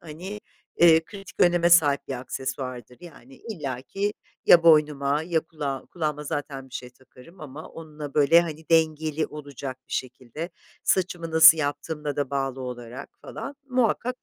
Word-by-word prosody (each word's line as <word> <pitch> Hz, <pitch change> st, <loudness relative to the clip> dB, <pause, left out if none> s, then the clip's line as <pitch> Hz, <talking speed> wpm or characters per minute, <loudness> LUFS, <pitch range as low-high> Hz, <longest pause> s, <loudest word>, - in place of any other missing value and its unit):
hani, 180 Hz, +6 st, -8 dB, 0.4 s
eee, 165 Hz, -1 st, +6 dB
kritik 195 Hz, +1 st, -12 dB
öneme 175 Hz, -1 st, +4 dB
sahip 150 Hz, -5 st, +4 dB
bir 135 Hz, -, -3 dB
aksesuardır. 130 Hz, -1 st, -6 dB
Yani 135 Hz, -6 st, -14 dB
illaki 165 Hz, -, -4 dB, 0.3 s
ya 170 Hz, -, +8 dB
boynuma 150 Hz, -2 st, +4 dB
ya 165 Hz, -1 st, 0 dB
kulağım 145 Hz, -5 st, -5 dB
kulağıma 150 Hz, -3 st, -3 dB
zaten 140 Hz, -2 st, -5 dB
bir -, -, -15 dB
şey 125 Hz, 0 st, -6 dB
takarım 130 Hz, +7 st, -18 dB
ama 150 Hz, +1 st, -9 dB
onunla 150 Hz, -3 st, -9 dB
böyle, 150 Hz, +3 st, +6 dB
hani, 160 Hz, -2 st, -6 dB
dengeli 160 Hz, -1 st, +2 dB
olacak 140 Hz, -3 st, -8 dB
bir -, -, -11 dB
şekilde. 130 Hz, +6 st, -5 dB, 0.3 s
Saçımı 175 Hz, -3 st, 0 dB
nasıl 160 Hz, 0 st, +8 dB
yaptığımla 145 Hz, 0 st, -3 dB
da 140 Hz, -2 st, -2 dB
bağlı 135 Hz, -1 st, -2 dB
olarak 125 Hz, +1 st, -7 dB
falan 280 Hz, 0 st, -7 dB
muhakkak 250 Hz, 0 st, 0 dB
150 Hz, 145 wpm, -25 LUFS, 135-165 Hz, 0.4 s, ya